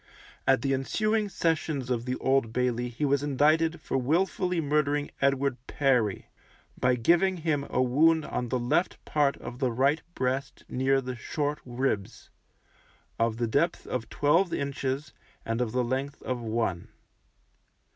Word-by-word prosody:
At 135 0 +4
the 135 -1 +1
ensuing 215 +10 0
sessions 155 -7 -1
of 120 -1 -1
the 125 0 -1
Old 130 -4 +1
Bailey 125 0 0
he 120 +5 -2
was 140 0 +2
indicted 155 +4 +2
for 135 - -1
wilfully 180 +5 +1
murdering 145 -1 0
Edward 140 -1 +2
Perry, 125 -8 +1 0.5
by 125 0 +2
giving 175 +10 +3
him 155 -4 -1
a - - +2
wound 155 +5 +3
on 125 -1 -3
the 130 - 0
left 125 +9 0
part 145 -2 +1
of 120 +1 -8
the 130 -3 +1
right 135 +6 +2
breast 130 +2 -2
near 135 +1 +1
the 130 -1 -5
short 145 +5 -2
ribs, 120 -5 -3 0.9
of 115 -1 +1
the 120 - 0
depth 140 +9 0
of 120 -3 -4
twelve 165 +5 +2
inches, 140 0 -3 0.3
and 115 +1 -1
of 120 -3 -1
the 125 +1 +1
length 135 +3 -3
of 125 -1 -2
one. 110 -6 -2
135 Hz, 150 wpm, -28 LUFS, 125-150 Hz, 0.9 s, At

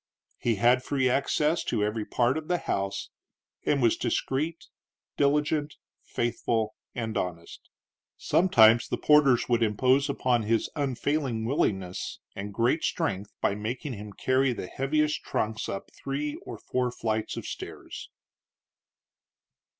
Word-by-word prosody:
He 115 -2 +1
had 120 +5 +4
free 135 -2 +1
access 150 +5 +1
to 105 - 0
every 105 +1 -1
part 125 +2 +1
of 155 -1 -4
the 180 - +2
house, 100 - -3 0.6
and 140 -3 +2
was 115 - +4
discreet, 140 +6 -2 0.5
diligent, 150 +1 +1 0.3
faithful, 115 -2 -1 0.2
and 115 -2 -3
honest. 85 -4 -5 0.5
Sometimes 115 -10 +5
the - - -2
porters 145 -5 +4
would 120 -1 +2
impose 130 +6 +3
upon 125 -3 +1
his 110 +1 0
unfailing 140 -4 -1
willingness 95 - -1 0.2
and 100 +1 -5
great 120 +9 +1
strength 105 - -1
by - - +2
making 120 +7 -4
him 105 -1 -8
carry 130 +5 +1
the 110 - -5
heaviest 150 +7 0
trunks 110 +1 -2
up 100 - -5
three 145 +2 -3
or 115 - -6
four 125 +3 -1
flights 110 -2 -2
of - - -5
stairs. - - -7
125 Hz, 130 wpm, -28 LUFS, 110-140 Hz, 0.6 s, Sometimes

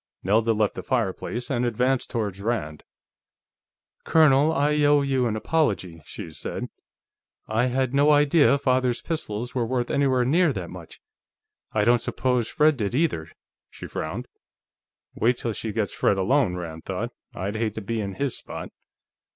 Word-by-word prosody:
Nelda 110 +4 +3
left 105 -1 +1
the - - -6
fireplace 115 +7 -2
and 120 -2 0
advanced 125 +2 0
toward 105 -4 -3
Rand. 100 -9 -3 1.2
"Colonel, 150 -1 +5
I 150 0 +1
owe 145 0 +4
you 135 -3 +1
an 110 - -1
apology," 105 - -1
she 80 - -8
said. 75 - -5 0.8
"I 110 +3 +1
had 130 0 0
no 145 +2 +4
idea 145 0 +5
Father's 130 -3 +1
pistols 120 -7 -4
were 125 - 0
worth 120 +1 -1
anywhere 130 -3 +2
near 160 +3 +3
that 90 -5 -6
much. 90 -3 -11 0.7
I 105 -1 +1
don't 120 +1 +4
suppose 125 -2 0
Fred 150 -1 +3
did, 105 0 -2
either." 130 - 0 0.4
She - - -10
frowned. - - -5 0.9
Wait 120 +2 +1
till 115 -2 -3
she 110 +1 -4
gets 105 -1 -2
Fred 100 - +2
alone, 110 0 +2
Rand 80 -3 -7
thought; - - -3 0.2
I'd 100 +4 -3
hate 110 -1 -1
to 110 - -4
be 110 +2 -2
in 100 -2 -4
his 140 -3 -2
spot.... - - -7
120 Hz, 160 wpm, -25 LUFS, 105-140 Hz, 1.2 s, Colonel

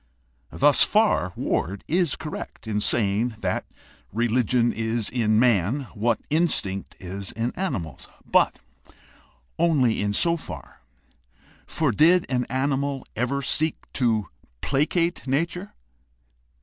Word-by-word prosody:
Thus - - +4
far - - +2
Ward 95 +5 -2
is 170 -2 +1
correct 155 -6 -7
in 105 -1 0
saying 110 +2 +1
that 95 -1 -2 0.4
religion 120 +2 +2
is 115 0 -2
in 110 -3 +2
man 120 +1 +3
what 115 +1 +1
instinct 150 - 0
is 95 +1 -6
in 115 +3 -2
animals. 95 - -4 0.2
But - - +3 1.0
only 145 -11 +3
in 100 0 0
so 170 +10 +2
far; 85 - -9 0.9
for 155 -5 0
did 170 - +4
an 125 -2 0
animal 135 +1 -1
ever 130 +5 -1
seek 155 +4 +1 0.2
to 110 -6 +1 0.3
placate 165 +4 0
nature 170 +8 -2
125 Hz, 110 wpm, -24 LUFS, 105-150 Hz, 1.0 s, Thus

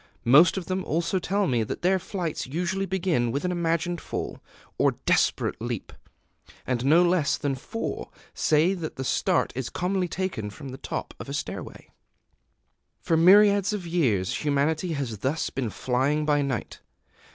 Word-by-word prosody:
Most 150 +10 +6
of 185 - -3
them 185 +1 -2
also 170 +4 0
tell 200 +3 0
me 120 -9 +1
that 110 - -4
their 190 +1 +3
flights 175 -6 -4
usually 180 +7 -2
begin 175 -11 0
with 140 +7 -2
an 180 - 0
imagined 170 0 -1
fall, - - -5 0.4
or - - +4
desperate - - +1
leap; - - -4 0.7
and 125 -2 -1
no 160 +6 +5
less 175 -4 +2
than 145 -2 -1
four 215 - -5 0.2
say 155 +5 +3
that 170 -5 -5
the 130 - -4
start - - +1
is 130 -1 -3
commonly 185 0 -1
taken 170 - -3
from 135 +7 -9
the 130 +1 -8
top - - -5
of - - -8
a - - -3
stairway. - - -6 1.1
[Decoration] - - -48
For 165 - +1
myriads 200 +4 +6
of 200 -4 -4
years 125 - +1
humanity 155 +4 0
has 130 -8 -4
thus 135 +8 -1
been 130 -4 -2
flying 135 +7 0
by 145 -1 +2
night. 135 -5 -3
160 Hz, 165 wpm, -26 LUFS, 135-180 Hz, 1.1 s, Most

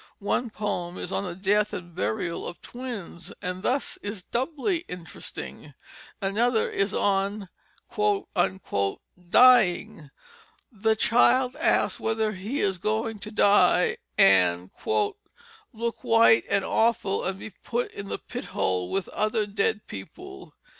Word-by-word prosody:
One 230 +4 -1
poem 190 -5 -3
is 180 - -5
on 200 - -1
the 175 -2 -5
death 205 +3 +1
and 175 -1 -7
burial 110 - -2
of 175 - -8
twins, 240 -9 -7
and 180 +1 -4
thus 260 +6 0
is 205 -2 -5
doubly 300 - -1
interesting. 180 -2 -8 0.4
Another 220 +4 +1
is 200 0 0
on 200 -1 0 1.8
"Dying." 190 - +5 0.6
The 220 0 +1
child 250 +3 +3
asks - - +1
whether 220 -1 0
he 215 +8 -3
is 190 -3 0
going 220 +2 -1
to 215 - -8
die 215 - +4 0.2
and 90 - +4 1.0
"look 235 -1 -4
white 225 0 +5
and 200 - +2
awful 220 -4 +1
and 190 +1 -2
be 215 - -8
put 240 +6 -3
in 200 - -8
the - - -3
pithole 90 -1 -3
with 195 - -1
other 215 0 0
dead 205 +1 -1
people." 95 -1 -10
205 Hz, 125 wpm, -26 LUFS, 185-225 Hz, 1.8 s, Dying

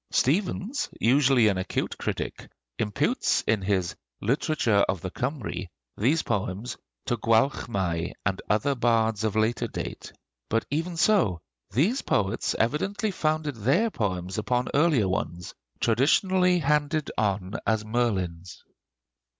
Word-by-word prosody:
Stephens, 195 - 0
usually 130 -1 +4
an 95 -3 +1
acute 95 - -2
critic, - - -4 0.3
imputes 105 -2 +1
in 110 -3 +2
his 95 -2 0 0.2
'Literature 115 -3 +2
of 95 -3 -1
the 95 - -5
Kymry' 125 -6 -3 0.3
these 140 +10 +2
poems 100 +5 -2 0.3
to 120 - 0
Gwalchmai 105 - +1
and 95 +1 0
other 110 +7 +2
bards 115 -3 +1
of 110 -2 0
later 110 +2 +1
date. - - -6 0.4
But 115 0 +1
even 165 +4 -2
so, 160 - +3 0.3
these 175 - +1
poets 105 +3 0
evidently 195 - 0
founded 155 -5 -1
their 140 - +2
poems 95 - -2
upon 125 +3 0
earlier 145 - +3
ones, 85 -1 -3 0.3
traditionally 180 - +3
handed 150 0 +1
on 100 -2 -1
as 110 -1 +1
Merlin's. 95 -7 -2
115 Hz, 120 wpm, -26 LUFS, 100-150 Hz, 0.4 s, usually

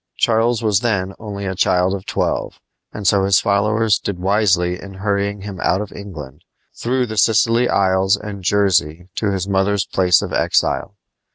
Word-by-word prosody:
Charles 115 0 +1
was 105 -3 +2
then 100 -5 -1
only 100 -2 -6
a 95 - -2
child 90 0 +1
of 95 -1 -6
twelve, - - -2 0.3
and 105 - -8
so 95 +1 +3
his 95 -1 +4
followers 105 +1 +1
did 100 - -4
wisely 90 -2 +1
in 100 -1 -10
hurrying 100 +1 -2
him 100 -2 -7
out 95 - +1
of 105 -1 -6
England, 75 -8 -10 0.3
through 125 +1 -1
the 110 -3 -3
Scilly 115 +3 +3
isles 95 0 +2
and 105 -2 -8
Jersey 90 -3 +1
to 105 - 0
his 95 -1 -2
mother's 100 0 +1
place 90 -2 +2
of - - -6
exile. 100 - 0
100 Hz, 170 wpm, -19 LUFS, 95-105 Hz, 0.3 s, his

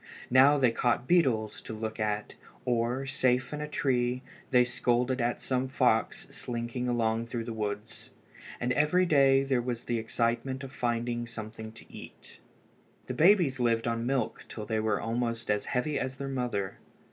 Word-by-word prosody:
Now 135 +3 +7
they 130 -4 +4
caught 120 +1 0
beetles 125 -12 +2
to 110 - -7
look 110 +1 -5
at, 105 0 -2 0.3
or, 125 +2 0
safe 130 0 +1
in 150 - -4
a 150 - -3
tree, 125 -3 0 0.3
they 125 -2 +5
scolded 125 +1 0
at 120 +1 0
some 130 0 0
fox 125 -4 +1
slinking 120 +1 -4
along 115 -1 0
through 115 0 -3
the 115 0 -5
woods. 105 -1 -5 0.5
And 125 +1 0
every 150 +7 +3
day 135 -4 +5
there 135 -3 +1
was 120 -1 -3
the 120 -1 -1
excitement 120 +4 -1
of 135 - -7
finding 120 -1 -2
something 110 -1 -7
to 115 - -13
eat. - - -12 0.7
The - - -4
babies 165 -6 +4
lived 115 -1 +1
on 115 0 -1
milk 130 -4 -1
till 110 - -7
they 110 0 -1
were 110 -2 0
almost 115 -1 -2
as 105 0 0
heavy 140 +4 -1
as 130 +1 -3
their 140 - -4
mother. 125 -8 -2
120 Hz, 170 wpm, -29 LUFS, 115-130 Hz, 0.7 s, Now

